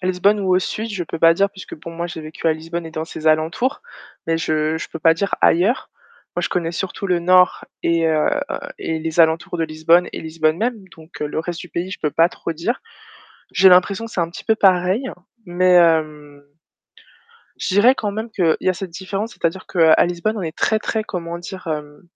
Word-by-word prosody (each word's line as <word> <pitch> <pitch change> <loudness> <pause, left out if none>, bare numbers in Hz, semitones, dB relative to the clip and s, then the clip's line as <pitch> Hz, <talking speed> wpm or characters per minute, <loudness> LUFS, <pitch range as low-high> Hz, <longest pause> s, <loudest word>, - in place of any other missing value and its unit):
À 180 - -3
Lisbonne 185 +3 +2
ou 185 -2 +2
au 185 - +5
sud, 220 +4 -4
je 200 -4 -3
peux 165 -1 -6
pas 165 0 +6
dire 200 +3 +1
puisque 190 -1 -10
bon, 165 +2 -10
moi, 170 +1 -4
j'ai 160 -1 -7
vécu 155 +1 -6
à 160 - +5
Lisbonne 165 +2 -6
et 160 - -10
dans 160 0 -3
ses 160 -1 -8
alentours, 160 - +1 0.4
mais 165 0 +1
je 155 0 0
je - - -6
peux 165 - -8
pas 165 +1 +5
dire 195 +5 -1
ailleurs. 220 +10 +2 0.5
Moi, - - +1
je - - 0
connais 170 -2 -1
surtout 190 +3 -4
le 180 -1 +2
nord 180 +1 +4 0.2
et, 165 -1 +2
heu, 155 -1 +2 0.5
et 160 -1 -3
les 160 +1 -4
alentours 165 +1 +2
de 165 - +1
Lisbonne 160 +3 +2
et - - -5
Lisbonne 160 0 0
même. 225 0 -2
Donc, 160 +1 -14
le 150 +1 -3
reste 170 +1 -5
du 180 - -9
pays, 175 +2 -4
je - - -6
peux 150 -2 -1
pas 165 +1 +4
trop 170 - -5
dire. 175 +10 -3 0.7
J'ai 190 0 +6
l'impression 190 +4 +4
que 225 - -12
c'est - - -1
un 165 0 -1
petit - - -10
peu 220 - +3
pareil, 190 +5 +2 0.4
mais, 180 +1 +2
hem, 155 -4 +2 1.2
je - - -3
dirais 230 +6 +6
quand 210 -6 -3
même 220 +3 -5
qu'il 170 -6 +1
y - - +2
a - - +2
cette 185 +1 -6
différence, 195 +6 -5
c'est-à-dire 170 +3 -3
qu'à 165 -3 +5
Lisbonne, 175 +5 -2
on - - -3
est 160 -2 -5
très 220 - +1
très 220 0 -2
comment 170 -4 -5
dire? 185 +1 -9
Hem 150 -2 -5
170 Hz, 220 wpm, -20 LUFS, 160-190 Hz, 1.2 s, pas